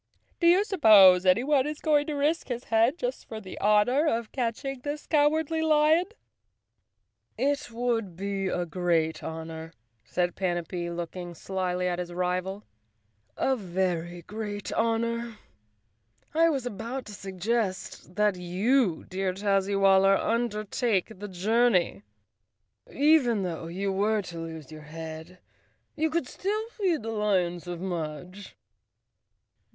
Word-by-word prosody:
"Do 340 Hz, -, +3 dB
you 360 Hz, +4 st, +6 dB
suppose 205 Hz, -, +6 dB
anyone 260 Hz, +8 st, +3 dB
is 300 Hz, 0 st, -5 dB
going 295 Hz, -2 st, +2 dB
to 305 Hz, -, -2 dB
risk 295 Hz, +4 st, 0 dB
his 245 Hz, -1 st, -4 dB
head 230 Hz, +7 st, +2 dB
just -, -, -4 dB
for 220 Hz, -, -6 dB
the 190 Hz, -3 st, -9 dB
honor 215 Hz, +9 st, +3 dB
of 230 Hz, -5 st, -1 dB
catching 255 Hz, +2 st, -3 dB
this 290 Hz, +3 st, -5 dB
Cowardly 315 Hz, +1 st, +2 dB
Lion?" 315 Hz, +2 st, +4 dB, 1.3 s
'ifft 285 Hz, +1 st, 0 dB
would 230 Hz, -5 st, -2 dB
be 195 Hz, +1 st, -2 dB
a 180 Hz, -1 st, -1 dB
great 165 Hz, -2 st, 0 dB
honor," 160 Hz, 0 st, -7 dB, 0.3 s
said 175 Hz, +7 st, -1 dB
Panapee, 175 Hz, -1 st, -2 dB
looking 175 Hz, +1 st, -6 dB
slyly 180 Hz, 0 st, -2 dB
at 175 Hz, 0 st, -1 dB
his 175 Hz, -1 st, -4 dB
rival, 180 Hz, +3 st, -2 dB, 0.7 s
"a 265 Hz, -, +2 dB
very 175 Hz, -4 st, -2 dB
great 205 Hz, +1 st, -5 dB
honor. 230 Hz, 0 st, -1 dB, 1.0 s
I 330 Hz, +1 st, +4 dB
was 275 Hz, -5 st, -1 dB
about 240 Hz, +3 st, -5 dB
to 210 Hz, -, -9 dB
suggest 195 Hz, -1 st, -3 dB
that 210 Hz, -2 st, +2 dB
you, 185 Hz, +3 st, +1 dB
dear 190 Hz, 0 st, -2 dB
Tazzywaller, 195 Hz, -1 st, +3 dB
undertake 225 Hz, -2 st, 0 dB
the 205 Hz, -, -6 dB
journey. 195 Hz, -, +2 dB, 0.9 s
Even 275 Hz, -8 st, +3 dB
though 165 Hz, -2 st, -4 dB
you 195 Hz, +4 st, -2 dB
were 205 Hz, +2 st, +1 dB
to 170 Hz, -2 st, -8 dB
lose 160 Hz, -3 st, -8 dB
your 155 Hz, 0 st, -9 dB
head, 160 Hz, +2 st, -8 dB, 0.6 s
you 320 Hz, 0 st, +1 dB
could 315 Hz, -4 st, -1 dB
still 425 Hz, -, -3 dB
feed 370 Hz, -, -1 dB
the 225 Hz, -, -3 dB
lions 185 Hz, -5 st, 0 dB
of 175 Hz, -1 st, -5 dB
Mudge." 180 Hz, +2 st, -6 dB
205 Hz, 130 wpm, -27 LUFS, 180-250 Hz, 1.3 s, you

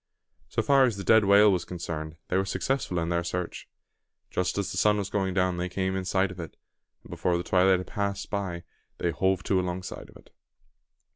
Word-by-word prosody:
So -, -, -1 dB
far 140 Hz, -2 st, +5 dB
as 115 Hz, -5 st, -1 dB
the 100 Hz, -, -5 dB
dead 110 Hz, 0 st, +5 dB
whale 100 Hz, +1 st, +6 dB
was 90 Hz, -3 st, 0 dB
concerned, 80 Hz, -3 st, -5 dB
they -, -, 0 dB
were 95 Hz, -, +3 dB
successful 105 Hz, -1 st, -2 dB
in 85 Hz, 0 st, -1 dB
their 85 Hz, 0 st, 0 dB
search. 90 Hz, 0 st, -4 dB, 0.6 s
Just 90 Hz, +2 st, -1 dB
as 100 Hz, -1 st, -1 dB
the -, -, -5 dB
sun 105 Hz, +1 st, +4 dB
was 100 Hz, -1 st, -3 dB
going 95 Hz, -2 st, -1 dB
down, 90 Hz, -2 st, +1 dB
they 90 Hz, +1 st, -2 dB
came 95 Hz, +1 st, -1 dB
in 95 Hz, -1 st, -3 dB
sight 95 Hz, +1 st, +1 dB
of 90 Hz, -, -10 dB
it; 85 Hz, -, -8 dB, 0.5 s
and -, -, -14 dB
before 90 Hz, -1 st, 0 dB
the 85 Hz, -, -3 dB
twilight 95 Hz, +1 st, +4 dB
had 90 Hz, -, -5 dB
passed 100 Hz, -1 st, -3 dB, 0.7 s
they 85 Hz, -, 0 dB
"hove 95 Hz, +1 st, 0 dB
to" 95 Hz, 0 st, +1 dB
along 90 Hz, 0 st, -3 dB
side -, -, -8 dB
of -, -, -18 dB
it. -, -, -21 dB
95 Hz, 215 wpm, -27 LUFS, 90-100 Hz, 0.7 s, whale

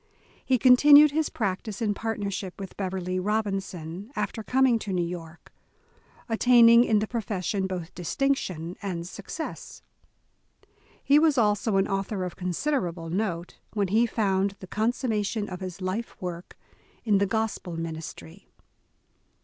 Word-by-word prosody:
He 260 Hz, -, +2 dB
continued 285 Hz, +4 st, +7 dB
his 310 Hz, +1 st, 0 dB
practice 205 Hz, -1 st, -3 dB
in 215 Hz, -3 st, 0 dB
partnership 200 Hz, -4 st, -4 dB
with 195 Hz, -1 st, -8 dB
Beverley 185 Hz, -1 st, -3 dB
Robinson 195 Hz, -2 st, -3 dB
after 210 Hz, +1 st, -3 dB
coming 250 Hz, +1 st, +3 dB
to 205 Hz, -, -5 dB
New 180 Hz, -2 st, 0 dB
York, 170 Hz, -1 st, -9 dB, 0.7 s
attaining 235 Hz, 0 st, +6 dB
in 220 Hz, -3 st, +2 dB
the 215 Hz, +1 st, 0 dB
profession 200 Hz, -4 st, -2 dB
both 180 Hz, -2 st, -5 dB
distinction 180 Hz, -, -2 dB
and 175 Hz, -4 st, -4 dB
success. 200 Hz, -, -7 dB, 1.2 s
He 285 Hz, +1 st, +5 dB
was 310 Hz, -3 st, +3 dB
also 210 Hz, -2 st, +2 dB
an 195 Hz, -, +2 dB
author 195 Hz, 0 st, -2 dB
of 180 Hz, -, -5 dB
considerable 180 Hz, -, -2 dB
note, 180 Hz, -3 st, -3 dB
when 200 Hz, -3 st, 0 dB
he 225 Hz, +4 st, +3 dB
found 200 Hz, -3 st, 0 dB
the -, -, -9 dB
consummation 215 Hz, 0 st, -1 dB
of 180 Hz, -1 st, -6 dB
his 185 Hz, 0 st, -6 dB
life 195 Hz, +6 st, -4 dB
work 175 Hz, -1 st, -7 dB, 0.5 s
in 210 Hz, -4 st, +3 dB
the 200 Hz, -, +2 dB
Gospel 215 Hz, -5 st, -2 dB
ministry. 165 Hz, +2 st, -7 dB
200 Hz, 135 wpm, -26 LUFS, 180-225 Hz, 1.2 s, continued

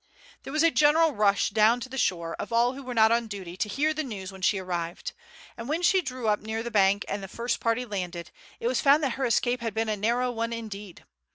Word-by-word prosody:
There -, -, -8 dB
was 310 Hz, +2 st, +2 dB
a 330 Hz, -, +5 dB
general 310 Hz, +2 st, +4 dB
rush 205 Hz, -5 st, +2 dB
down 220 Hz, +3 st, +4 dB
to 260 Hz, -, -5 dB
the 260 Hz, -, -9 dB
shore 170 Hz, -6 st, -1 dB
of -, -, -5 dB
all 235 Hz, +2 st, +3 dB
who 275 Hz, -, -8 dB
were 250 Hz, -2 st, -6 dB
not 220 Hz, 0 st, +5 dB
on 235 Hz, 0 st, +1 dB
duty 190 Hz, -5 st, -7 dB
to 210 Hz, -, -2 dB
hear 305 Hz, +7 st, +1 dB
the 310 Hz, -, -2 dB
news 200 Hz, -9 st, -6 dB
when 190 Hz, -1 st, -12 dB
she 195 Hz, +1 st, +2 dB
arrived; 175 Hz, -2 st, -4 dB, 0.4 s
and 230 Hz, +2 st, -8 dB
when 325 Hz, +4 st, -1 dB
she 375 Hz, +1 st, +4 dB
drew 255 Hz, -6 st, -5 dB
up 210 Hz, -1 st, +2 dB
near 220 Hz, +1 st, -4 dB
the 235 Hz, -, -5 dB
bank 200 Hz, -1 st, +3 dB
and 200 Hz, -, -3 dB
the 195 Hz, -, -7 dB
first 235 Hz, +5 st, -3 dB
party 230 Hz, +2 st, 0 dB
landed, 180 Hz, -5 st, -5 dB, 0.3 s
it -, -, -7 dB
was 250 Hz, 0 st, +1 dB
found 290 Hz, +2 st, +5 dB
that 270 Hz, -, +1 dB
her 265 Hz, +1 st, -2 dB
escape 240 Hz, +1 st, +1 dB
had 225 Hz, -3 st, -4 dB
been 225 Hz, 0 st, 0 dB
a 215 Hz, -, 0 dB
narrow 240 Hz, +5 st, 0 dB
one 230 Hz, 0 st, -3 dB
indeed. 210 Hz, -5 st, -8 dB
230 Hz, 255 wpm, -27 LUFS, 200-255 Hz, 0.4 s, a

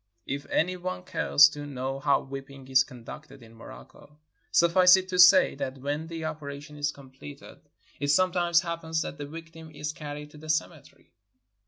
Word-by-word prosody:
If 140 Hz, +1 st, -5 dB
any 180 Hz, +3 st, 0 dB
one 185 Hz, 0 st, -5 dB
cares 150 Hz, -4 st, +5 dB
to 145 Hz, -1 st, -8 dB
know 135 Hz, 0 st, -4 dB
how 140 Hz, 0 st, +2 dB
whipping 135 Hz, 0 st, -10 dB
is 130 Hz, 0 st, +4 dB
conducted 135 Hz, +2 st, -12 dB
in 115 Hz, 0 st, -16 dB
Morocco, 145 Hz, +5 st, -14 dB, 0.3 s
suffice 180 Hz, +2 st, +6 dB
it 190 Hz, 0 st, -4 dB
to 180 Hz, -1 st, -2 dB
say 180 Hz, +10 st, +7 dB
that 135 Hz, -1 st, -5 dB
when 145 Hz, +4 st, -4 dB
the 165 Hz, -1 st, -6 dB
operation 150 Hz, -1 st, -7 dB
is 145 Hz, 0 st, -1 dB
completed 130 Hz, -, -13 dB, 0.4 s
it 145 Hz, -, -2 dB
some 185 Hz, +5 st, +3 dB
times 175 Hz, -2 st, +2 dB
happens 165 Hz, -2 st, -3 dB
that 145 Hz, -, -8 dB
the 145 Hz, -, -6 dB
victim 165 Hz, +1 st, -11 dB
is 150 Hz, 0 st, -6 dB
carried 150 Hz, -1 st, -8 dB
to 150 Hz, -, -14 dB
the 155 Hz, +1 st, -11 dB
cemetery. 155 Hz, -, -4 dB
150 Hz, 175 wpm, -27 LUFS, 140-165 Hz, 0.4 s, say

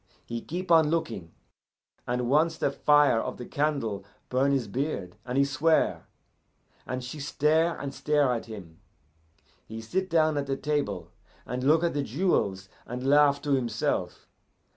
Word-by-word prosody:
He 115 Hz, 0 st, -5 dB
keep 180 Hz, +2 st, -5 dB
on 160 Hz, -2 st, +6 dB
looking, 115 Hz, -, -2 dB, 0.8 s
and 125 Hz, 0 st, -1 dB
once 160 Hz, +5 st, +2 dB
the 140 Hz, -, 0 dB
fire 145 Hz, -4 st, +4 dB
of -, -, -4 dB
the 125 Hz, -, -7 dB
candle 140 Hz, -10 st, -1 dB, 0.3 s
burn 135 Hz, +2 st, +2 dB
his 135 Hz, -5 st, 0 dB
beard, 100 Hz, -, -3 dB
and 125 Hz, +1 st, -2 dB
he 140 Hz, -, +5 dB
swear, 155 Hz, +3 st, +1 dB, 0.8 s
and 130 Hz, 0 st, -3 dB
she 130 Hz, +5 st, -7 dB
stare 155 Hz, +4 st, +1 dB
and 140 Hz, -1 st, -5 dB
stare 145 Hz, -4 st, +2 dB
at 115 Hz, -, -4 dB
him. 95 Hz, -8 st, -10 dB, 0.9 s
He 110 Hz, +1 st, -7 dB
sit 185 Hz, +12 st, -2 dB
down 155 Hz, -3 st, +2 dB
at 140 Hz, -, -4 dB
the 135 Hz, 0 st, -1 dB
table, 140 Hz, -, -2 dB, 0.3 s
and 125 Hz, +1 st, -4 dB
look 155 Hz, +4 st, +4 dB
at 170 Hz, -, +1 dB
the 145 Hz, -, 0 dB
jewels 115 Hz, -, 0 dB, 0.2 s
and 125 Hz, +2 st, -5 dB
laugh 145 Hz, 0 st, +4 dB
to 145 Hz, -, -2 dB
himself. 130 Hz, -4 st, -1 dB
140 Hz, 160 wpm, -27 LUFS, 120-155 Hz, 0.9 s, on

